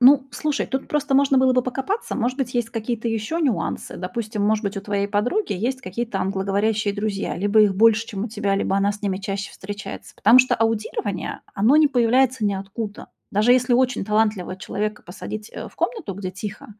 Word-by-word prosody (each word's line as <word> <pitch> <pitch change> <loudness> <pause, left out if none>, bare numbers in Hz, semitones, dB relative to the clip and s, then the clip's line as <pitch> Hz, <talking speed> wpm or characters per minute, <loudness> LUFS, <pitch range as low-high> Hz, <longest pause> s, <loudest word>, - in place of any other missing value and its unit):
Ну, 270 +1 +6
слушай, 295 +4 -1
тут 265 0 -3
просто 295 -2 0
можно 275 0 +4
было 260 0 +4
бы 255 -1 +3
покопаться. 270 - -3
Может 255 +2 -1
быть, 255 -2 -2
есть 240 -1 0
какие-то 230 0 -3
ещё 225 +8 -2
нюансы. 235 - -1
Допустим, 210 +3 -4
может 215 +1 +1
быть, 200 0 -2
у 195 - -2
твоей 200 0 -1
подруги 245 - 0
есть 260 0 -2
какие-то 215 0 -4
англоговорящие 200 +2 0
друзья, 205 -1 -2
либо 205 +4 +3
их 205 -3 +4
больше, 225 +2 +4
чем 200 -1 -4
у - - -4
тебя, 205 -2 -1
либо 195 - 0
она 200 +1 +2
с 210 - -11
ними 195 -2 -1
чаще 200 0 -4
встречается. 205 +1 -8
Потому 245 - +6
что 255 0 +5
аудирование, 215 -3 -2
оно 225 +9 +4
не 305 -1 +6
появляется 250 -1 +2
ниоткуда. 200 +2 -3 0.3
Даже 215 +5 +4
если 250 -1 +3
очень 255 -3 +2
талантливого 210 -3 0
человека 210 +2 -3
посадить, 210 +4 -7
э, - - -6
в - - -21
комнату, 435 - -2
где 185 -1 -5
тихо, 200 +2 -7
215 Hz, 195 wpm, -23 LUFS, 200-255 Hz, 0.3 s, Ну